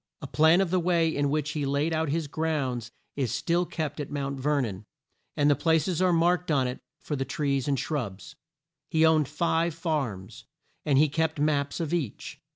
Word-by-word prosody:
A -, -, -7 dB
plan 160 Hz, +4 st, +4 dB
of 185 Hz, -3 st, -1 dB
the 185 Hz, -, +3 dB
way 170 Hz, -2 st, +1 dB
in 145 Hz, 0 st, +1 dB
which 150 Hz, 0 st, -1 dB
he 150 Hz, -1 st, -2 dB
laid 140 Hz, +4 st, 0 dB
out 160 Hz, -1 st, 0 dB
his 160 Hz, +2 st, -1 dB
grounds 140 Hz, -6 st, -2 dB, 0.3 s
is 135 Hz, -5 st, -1 dB
still 175 Hz, +1 st, 0 dB
kept 155 Hz, -2 st, -4 dB
at 145 Hz, -, -4 dB
Mount 140 Hz, -1 st, -3 dB
Ver 145 Hz, +2 st, +1 dB
non, 105 Hz, -4 st, -5 dB, 0.5 s
and 145 Hz, -1 st, +3 dB
the 145 Hz, -, +5 dB
pla 160 Hz, +3 st, +3 dB
ces 165 Hz, +2 st, -1 dB
are 185 Hz, -1 st, +4 dB
marked 175 Hz, +1 st, +2 dB
on 140 Hz, -4 st, +2 dB
it 125 Hz, -, -5 dB, 0.2 s
for 150 Hz, -, -4 dB
the 135 Hz, -, -1 dB
trees 140 Hz, 0 st, -1 dB
and 140 Hz, -2 st, +1 dB
shrubs. 120 Hz, -5 st, -4 dB, 0.5 s
He 160 Hz, 0 st, +3 dB
owned 155 Hz, -3 st, +4 dB
five 165 Hz, +2 st, 0 dB
farms, 140 Hz, -, -3 dB, 0.4 s
and 140 Hz, -3 st, +3 dB
he 150 Hz, +2 st, +5 dB
kept 160 Hz, +1 st, -1 dB
maps 145 Hz, -1 st, 0 dB
of 165 Hz, -1 st, -2 dB
each. 150 Hz, -11 st, -4 dB
150 Hz, 200 wpm, -27 LUFS, 140-160 Hz, 0.5 s, the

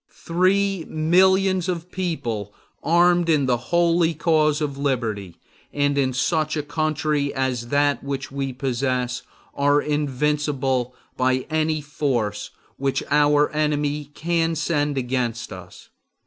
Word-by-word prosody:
Three 185 Hz, +1 st, +2 dB
millions 185 Hz, +3 st, +3 dB
of 175 Hz, 0 st, -4 dB
people 120 Hz, -, -3 dB, 0.3 s
armed 175 Hz, +1 st, +3 dB
in 150 Hz, -4 st, +3 dB
the 125 Hz, -2 st, +2 dB
holy 170 Hz, -1 st, +3 dB
cause 155 Hz, -1 st, +2 dB
of 145 Hz, -3 st, -2 dB
liberty, 115 Hz, -10 st, -2 dB, 0.3 s
and 145 Hz, 0 st, +1 dB
in 135 Hz, -2 st, +1 dB
such 155 Hz, +4 st, 0 dB
a 150 Hz, -, -1 dB
country 150 Hz, -1 st, -1 dB
as 130 Hz, -3 st, -1 dB
that 145 Hz, +2 st, +1 dB
which 140 Hz, -1 st, -4 dB
we 135 Hz, -1 st, -3 dB
possess, 125 Hz, -1 st, -2 dB, 0.3 s
are 145 Hz, +1 st, +3 dB
invincible 145 Hz, -3 st, -1 dB, 0.2 s
by 130 Hz, 0 st, +1 dB
any 155 Hz, 0 st, 0 dB
force 125 Hz, -8 st, -2 dB, 0.3 s
which 135 Hz, 0 st, -1 dB
our 145 Hz, 0 st, +4 dB
enemy 150 Hz, -1 st, 0 dB
can 165 Hz, 0 st, 0 dB
send 145 Hz, -2 st, 0 dB
against 125 Hz, -3 st, -2 dB
us. -, -, -12 dB
145 Hz, 120 wpm, -23 LUFS, 130-160 Hz, 0.3 s, our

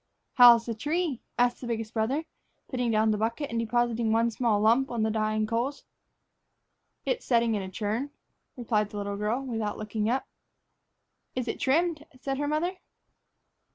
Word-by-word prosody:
"How's 240 Hz, -2 st, +8 dB
the 230 Hz, -, -2 dB
tree?" 295 Hz, +3 st, -2 dB, 0.2 s
asked 245 Hz, 0 st, +2 dB
the 245 Hz, -, -5 dB
biggest 225 Hz, -1 st, -3 dB
brother, 255 Hz, +8 st, 0 dB, 0.4 s
putting 250 Hz, -3 st, -1 dB
down 220 Hz, 0 st, +3 dB
the 210 Hz, -, 0 dB
bucket 230 Hz, +6 st, -2 dB
and 230 Hz, -, -1 dB
depositing 235 Hz, 0 st, +1 dB
one 230 Hz, +1 st, +2 dB
small 225 Hz, -2 st, +1 dB
lump 235 Hz, +6 st, +3 dB
on 235 Hz, -2 st, -1 dB
the 220 Hz, -, +1 dB
dying 215 Hz, 0 st, 0 dB
coals. 235 Hz, +6 st, -2 dB, 1.2 s
"It's -, -, -1 dB
setting 235 Hz, -2 st, +2 dB
in 205 Hz, -, -1 dB
a 190 Hz, -, -6 dB
churn," 215 Hz, +8 st, -2 dB, 0.5 s
replied 215 Hz, -4 st, 0 dB
the 210 Hz, -, -8 dB
little 200 Hz, 0 st, -3 dB
girl, 215 Hz, +6 st, -1 dB
without 225 Hz, -4 st, -3 dB
looking 215 Hz, 0 st, -2 dB
up. 260 Hz, +3 st, 0 dB, 1.1 s
"Is 250 Hz, -1 st, -2 dB
it -, -, -3 dB
trimmed?" 315 Hz, +2 st, +1 dB
said 270 Hz, +1 st, -3 dB
her 290 Hz, -, -1 dB
mother. 335 Hz, +5 st, -1 dB
235 Hz, 165 wpm, -28 LUFS, 220-265 Hz, 1.2 s, How's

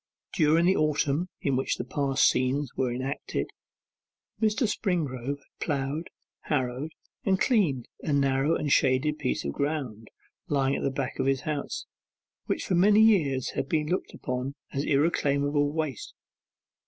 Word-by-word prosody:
During 160 Hz, 0 st, +4 dB
the 190 Hz, +2 st, +4 dB
autumn 150 Hz, +2 st, +1 dB
in 140 Hz, -2 st, +1 dB
which 130 Hz, -, 0 dB
the -, -, -3 dB
past 140 Hz, -2 st, +2 dB
scenes 130 Hz, +1 st, +1 dB
were 130 Hz, -2 st, 0 dB
enacted, 130 Hz, +3 st, -3 dB, 0.9 s
Mr. 220 Hz, +2 st, +2 dB
Springrove 145 Hz, -, -1 dB
had 140 Hz, -, -32 dB
ploughed, 145 Hz, +2 st, -2 dB, 0.4 s
harrowed, 135 Hz, +2 st, -1 dB, 0.3 s
and 190 Hz, -1 st, +2 dB
cleaned 170 Hz, -, +2 dB
a 155 Hz, -, -2 dB
narrow 140 Hz, +2 st, +2 dB
and 145 Hz, -, -1 dB
shaded 140 Hz, +4 st, +3 dB
piece 60 Hz, -, -1 dB
of 70 Hz, -, -2 dB
ground, 135 Hz, -, -3 dB, 0.4 s
lying 140 Hz, -4 st, +1 dB
at -, -, -3 dB
the -, -, +1 dB
back 135 Hz, -1 st, -4 dB
of -, -, +1 dB
his 135 Hz, -1 st, +2 dB
house, 150 Hz, -2 st, -3 dB, 0.6 s
which -, -, -1 dB
for -, -, -1 dB
many 205 Hz, +4 st, +5 dB
years 160 Hz, -, +4 dB
had 135 Hz, -, -3 dB
been 155 Hz, -1 st, 0 dB
looked 185 Hz, -, -2 dB
upon 125 Hz, +2 st, -3 dB, 0.2 s
as 140 Hz, 0 st, -1 dB
irreclaimable 145 Hz, -1 st, +2 dB
waste. 155 Hz, -6 st, -4 dB
145 Hz, 150 wpm, -27 LUFS, 135-160 Hz, 0.9 s, many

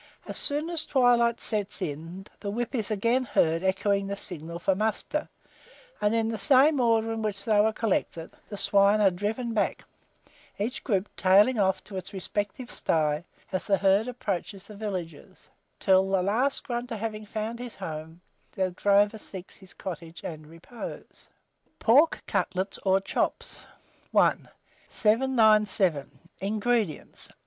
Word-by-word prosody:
As -, -, -6 dB
soon 300 Hz, +4 st, +1 dB
as 330 Hz, -2 st, +4 dB
twilight 240 Hz, -3 st, +3 dB
sets 210 Hz, -3 st, -1 dB
in, 170 Hz, +2 st, -6 dB
the 200 Hz, -, -5 dB
whip 235 Hz, +4 st, -3 dB
is 225 Hz, -5 st, -2 dB
again 230 Hz, +5 st, +1 dB
heard 165 Hz, -8 st, +1 dB
echoing 195 Hz, +1 st, 0 dB
the 200 Hz, -, -3 dB
signal 170 Hz, -4 st, -5 dB
for 185 Hz, +3 st, +1 dB
muster; 220 Hz, +9 st, -2 dB, 0.7 s
and 210 Hz, +2 st, +2 dB
in 225 Hz, -1 st, +1 dB
the 225 Hz, -, -3 dB
same 280 Hz, +1 st, +5 dB
order 225 Hz, -2 st, +2 dB
in 225 Hz, -, -4 dB
which 205 Hz, -2 st, -3 dB
they 215 Hz, -3 st, +4 dB
were 220 Hz, +1 st, +3 dB
collected, 190 Hz, -6 st, -2 dB, 0.2 s
the 205 Hz, -, -6 dB
swine 200 Hz, +1 st, +4 dB
are 200 Hz, -2 st, +5 dB
driven 220 Hz, +6 st, -3 dB
back, 210 Hz, -3 st, -1 dB, 0.7 s
each 220 Hz, +6 st, -3 dB
group 200 Hz, -4 st, 0 dB
tailing 205 Hz, +6 st, +4 dB
off 190 Hz, -1 st, +1 dB
to 195 Hz, -, -8 dB
its 185 Hz, +2 st, -6 dB
respective 205 Hz, +6 st, -4 dB
sty, 155 Hz, 0 st, 0 dB, 0.3 s
as 185 Hz, -, -2 dB
the 195 Hz, -2 st, +2 dB
herd 195 Hz, +4 st, +3 dB
approaches 200 Hz, -5 st, -4 dB
the 210 Hz, -, -12 dB
villages, 185 Hz, -7 st, -7 dB, 0.3 s
till 190 Hz, 0 st, +3 dB
the 190 Hz, -2 st, +1 dB
last 240 Hz, +8 st, +1 dB
grunter, 240 Hz, -3 st, -4 dB
having 215 Hz, 0 st, -5 dB
found 220 Hz, +2 st, -4 dB
his 245 Hz, -1 st, -7 dB
home, 160 Hz, -2 st, -7 dB, 0.3 s
the 185 Hz, -1 st, -1 dB
drover 205 Hz, +3 st, +2 dB
seeks 190 Hz, -3 st, -9 dB
his 190 Hz, -2 st, -15 dB
cottage 170 Hz, -2 st, -7 dB
and 155 Hz, -2 st, -7 dB
repose. 165 Hz, +9 st, -10 dB, 0.5 s
PORK 285 Hz, +8 st, +4 dB
CUTLETS 185 Hz, +1 st, -2 dB
OR 190 Hz, 0 st, +2 dB
CHOPS. -, -, -3 dB, 0.5 s
I. -, -, +5 dB, 0.5 s
797. 215 Hz, -, +3 dB, 0.3 s
INGREDIENTS. 210 Hz, -3 st, -2 dB
205 Hz, 145 wpm, -27 LUFS, 190-230 Hz, 0.7 s, same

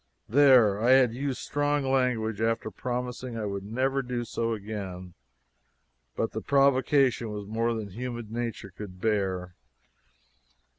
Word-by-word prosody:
There 120 Hz, -6 st, +5 dB
I 125 Hz, +3 st, +5 dB
had 130 Hz, -3 st, +5 dB
used 135 Hz, +1 st, -2 dB
strong 145 Hz, 0 st, 0 dB
language 125 Hz, -5 st, 0 dB
after 115 Hz, -1 st, 0 dB
promising 125 Hz, -1 st, -4 dB
I 110 Hz, -, -3 dB
would 100 Hz, -1 st, -4 dB
never 130 Hz, +6 st, 0 dB
do 125 Hz, -2 st, -3 dB
so 115 Hz, 0 st, -2 dB
again; 100 Hz, -4 st, -6 dB, 1.0 s
but -, -, -1 dB
the -, -, -4 dB
provocation 135 Hz, -3 st, +3 dB
was 105 Hz, -1 st, -5 dB
more 115 Hz, +3 st, -1 dB
than 105 Hz, -3 st, -5 dB
human 120 Hz, 0 st, -6 dB
nature 115 Hz, -4 st, -4 dB
could 95 Hz, -3 st, -9 dB
bear. 95 Hz, -4 st, -1 dB
115 Hz, 135 wpm, -28 LUFS, 105-130 Hz, 1.0 s, There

